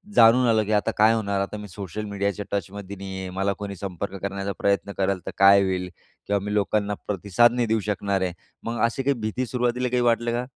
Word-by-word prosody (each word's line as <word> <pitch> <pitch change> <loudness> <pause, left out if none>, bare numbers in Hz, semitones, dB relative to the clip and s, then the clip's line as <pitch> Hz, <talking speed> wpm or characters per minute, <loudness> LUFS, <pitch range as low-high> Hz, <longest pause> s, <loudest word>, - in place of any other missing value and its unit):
जाणून 120 +2 +6
आलं 110 -1 +3
की 105 - -3
आता 105 - +2
काय 110 +1 +6
होणार? 100 -3 -1
आता 100 +2 -4
मी 105 0 -8
सोशल 100 +2 -6
मीडियाच्या 100 0 -2
टचमध्ये 100 0 -4
नाही 95 0 -6
आहे. 95 -1 -5
मला 100 +1 +1
कोणी 100 -1 -5
संपर्क 95 +1 -5
करण्याचा 100 0 -3
प्रयत्न 100 0 +1
कराल 95 -1 +1
तर - - -2
काय 100 0 +7
होईल 90 -1 -1 0.4
किंवा 100 0 +1
मी 105 - -3
लोकांना 105 0 +1
प्रतिसाद 105 +4 +3
नाही 120 -1 0
देऊ 110 0 +2
शकणार 100 -1 0
आहे. 90 -1 -1 0.3
मग 115 0 -3
अशी 120 +3 -2
काही 140 +1 +2
भीती 110 +4 -2
सुरुवातीला 125 +1 0
काही 125 0 +1
वाटलं 120 0 +2
का? 120 +1 -1
100 Hz, 215 wpm, -24 LUFS, 100-115 Hz, 0.4 s, काय